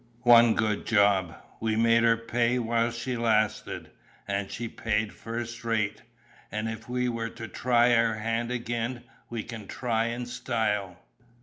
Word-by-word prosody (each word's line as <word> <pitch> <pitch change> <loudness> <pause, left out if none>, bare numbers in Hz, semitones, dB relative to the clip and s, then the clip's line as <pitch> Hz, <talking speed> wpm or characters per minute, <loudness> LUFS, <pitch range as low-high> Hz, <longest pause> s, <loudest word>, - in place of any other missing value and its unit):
One 120 -1 +7
good 110 -2 0
job: 100 -5 +3 0.2
we 110 -1 0
made 115 +1 +4
her 115 -1 +4
pay 120 +1 0
while 115 0 +1
she 120 +2 -4
lasted, 110 -3 0 0.4
and 100 0 -2
she 120 - -4
paid 110 -1 -1
first 120 +1 -6
rate; 110 -3 -1 0.5
and 105 +1 -2
if 110 +1 -6
we 125 0 0
were 115 -1 -2
to 115 0 -8
try 120 +3 +3
our 115 -1 +3
hand 115 +2 -2
again, 120 0 -3 0.3
we 115 -2 -4
can 110 -3 -8
try 115 -3 -1
in 120 +1 -3
style. 110 -6 -2
115 Hz, 150 wpm, -28 LUFS, 110-120 Hz, 0.5 s, One